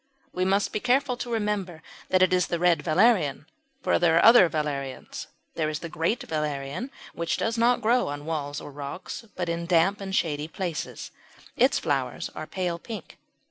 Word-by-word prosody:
We 185 0 0
must 195 +1 +1
be - - 0
careful 255 +2 +2
to 240 - -5
remember 205 -7 -2 0.3
that 185 0 +4
it 185 0 +3
is 180 0 +3
the 170 - -1
Red 175 0 +3
Valerian, 175 - +3 0.4
for - - +2
there 170 -2 +4
are - - +5
other 230 -6 +8
valerians. 140 -4 -4 0.3
There 155 -2 -1
is 155 - -2
the 170 - -7
Great 165 +9 -1
Valerian 150 - -3 0.2
which 170 0 -1
does 225 0 -1
not 240 +1 +3
grow 245 +3 +3
on 145 +1 -5
walls 145 -3 -3
or - - -9
rocks, 145 +10 -7
but 180 -1 -2
in 170 0 -2
damp 180 +4 +3
and 190 -1 -3
shady 150 -4 0
places; 170 -1 -5 0.4
its - - +4
flowers - - -1
are 155 - -6
pale 180 -3 -2
pink. 225 +4 -9
175 Hz, 180 wpm, -26 LUFS, 155-205 Hz, 0.4 s, other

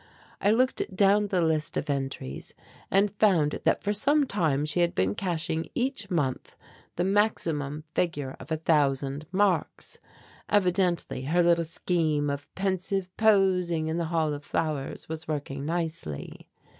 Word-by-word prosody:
I 200 - +3
looked 255 +4 +2
down 205 +1 +4
the 185 -3 +1
list 155 -2 0
of - - -2
entries 135 - -4 0.3
and 200 +1 +3
found 185 -8 +2
that - - +2
for 205 - +1
some 285 +7 +3
time 155 - 0
she 155 +3 -1
had 170 0 +2
been 95 +1 +1
cashing 165 - -2
each 250 -5 -1
month 145 -8 -2 0.4
the 175 - 0
maximum 165 -7 0
figure 145 -7 -1
of 135 +5 -11
a 160 - +1
thousand 145 -2 +1
marks. 195 0 0 0.5
Evidently 180 -8 +1
her 175 +5 +3
little 170 -1 +3
scheme 155 -3 0
of 140 0 -6
pensive 190 -1 -2
posing 185 -6 +3
in 160 - -1
the 170 - -1
Hall 160 -2 0
of 145 0 -6
Flowers 150 -4 -3
was 160 0 -6
working 145 -2 -4
nicely. 165 - -4
165 Hz, 145 wpm, -27 LUFS, 150-195 Hz, 0.5 s, down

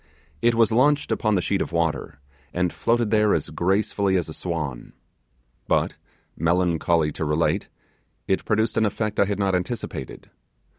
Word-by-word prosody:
It 120 0 +3
was 115 -1 +4
launched 140 +5 +3
upon 110 -3 +1
the 90 - +1
sheet 100 - 0
of - - -3
water, 85 -3 -1 0.4
and 90 -1 0
floated 115 -2 +1
there 105 -1 +4
as - - -3
gracefully 100 +1 +1
as 90 -3 0
a - - -6
swan. 75 -9 -4 0.7
But, - - +1 0.4
melancholy 85 -1 +1
to 80 - -4
relate, 75 +2 0 0.6
it 95 - +1
produced 110 0 0
an 110 - +3
effect 105 0 -2
I 100 - +5
had 100 0 -2
not 100 -2 +1
anticipated. 90 - -4
95 Hz, 155 wpm, -24 LUFS, 85-110 Hz, 0.7 s, I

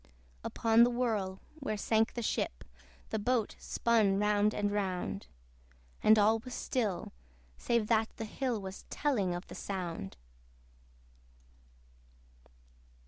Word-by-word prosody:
Upon 225 0 +4
the 240 - +5
whirl, 220 -6 -1 0.2
where 215 -7 -2
sank 220 +2 +1
the 240 - -2
ship, 60 - -1 0.5
The 220 - 0
boat 235 0 0
spun 220 -4 +2
round 210 0 +3
and 205 -1 -1
round; 195 -1 -2 0.7
And 220 - +6
all 215 +2 +4
was 250 +2 -8
still, 215 -8 -2 0.5
save 235 -2 +1
that 220 -1 +3
the 225 - -3
hill 245 +1 -2
Was 190 -1 -8
telling 210 -12 0
of 175 - -6
the - - -11
sound. 175 - -5
215 Hz, 120 wpm, -32 LUFS, 195-235 Hz, 0.7 s, And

